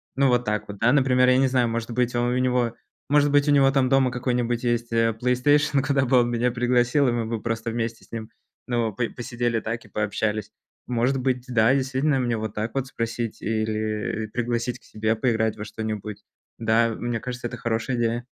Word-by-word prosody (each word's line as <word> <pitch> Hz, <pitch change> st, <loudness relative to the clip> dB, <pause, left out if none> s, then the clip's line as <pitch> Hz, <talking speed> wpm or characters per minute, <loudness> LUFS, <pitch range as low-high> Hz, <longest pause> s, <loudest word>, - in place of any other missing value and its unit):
ну, 135 Hz, +1 st, +3 dB
вот 125 Hz, 0 st, +2 dB
так 105 Hz, 0 st, -2 dB
вот, 105 Hz, -, -7 dB
да, 120 Hz, +3 st, +4 dB
например. 130 Hz, -2 st, +4 dB
Я 130 Hz, -, +5 dB
не 135 Hz, -, +4 dB
знаю, 125 Hz, -2 st, +2 dB
может 115 Hz, +1 st, -3 dB
быть, 125 Hz, 0 st, 0 dB
он 120 Hz, 0 st, +1 dB
у 125 Hz, -, 0 dB
него, 125 Hz, -2 st, +1 dB, 0.3 s
может 145 Hz, 0 st, +4 dB
быть, 145 Hz, 0 st, +3 dB
у -, -, +5 dB
него 140 Hz, -2 st, +5 dB
там 135 Hz, -2 st, +2 dB
дома 135 Hz, -2 st, +3 dB
какой-нибудь 120 Hz, -1 st, -1 dB
есть, 120 Hz, -1 st, -1 dB
э, 115 Hz, 0 st, +3 dB
"Плейстейшн", 135 Hz, +5 st, +2 dB
куда 135 Hz, 0 st, +1 dB
бы 125 Hz, 0 st, +4 dB
он 120 Hz, -, 0 dB
меня 120 Hz, +1 st, +1 dB
пригласил, 125 Hz, +3 st, +2 dB
и -, -, +1 dB
мы 120 Hz, -1 st, -1 dB
бы 110 Hz, -1 st, -3 dB
просто 115 Hz, +1 st, -2 dB
вместе 115 Hz, 0 st, -4 dB
с -, -, -31 dB
ним, 110 Hz, -1 st, -5 dB, 0.4 s
ну, 120 Hz, -4 st, -1 dB
по 115 Hz, +2 st, -2 dB
посидели 120 Hz, -1 st, -2 dB
так 115 Hz, +1 st, -4 dB
и 110 Hz, -, -17 dB
пообщались. 105 Hz, +1 st, -2 dB, 0.4 s
Может 125 Hz, +2 st, +1 dB
быть, 125 Hz, -1 st, 0 dB
да, 115 Hz, +1 st, +4 dB
действительно, 135 Hz, +2 st, +1 dB
мне 120 Hz, -3 st, 0 dB
вот 110 Hz, -1 st, -4 dB
так 110 Hz, +2 st, -3 dB
вот 135 Hz, -1 st, -2 dB
спросить 115 Hz, -2 st, -4 dB
или, 110 Hz, 0 st, -2 dB
и, -, -, -5 dB
пригласить 120 Hz, +1 st, -2 dB
к -, -, -31 dB
себе 110 Hz, +1 st, -1 dB
поиграть 110 Hz, -2 st, 0 dB
во 105 Hz, -, -6 dB
что-нибудь. 105 Hz, -1 st, -5 dB, 0.4 s
Да, 115 Hz, +1 st, +3 dB
мне 120 Hz, -1 st, -2 dB
кажется, 125 Hz, -1 st, -5 dB
это -, -, -7 dB
хорошая 115 Hz, +2 st, -2 dB
идея. 120 Hz, +1 st, -1 dB
120 Hz, 210 wpm, -24 LUFS, 115-125 Hz, 0.4 s, Я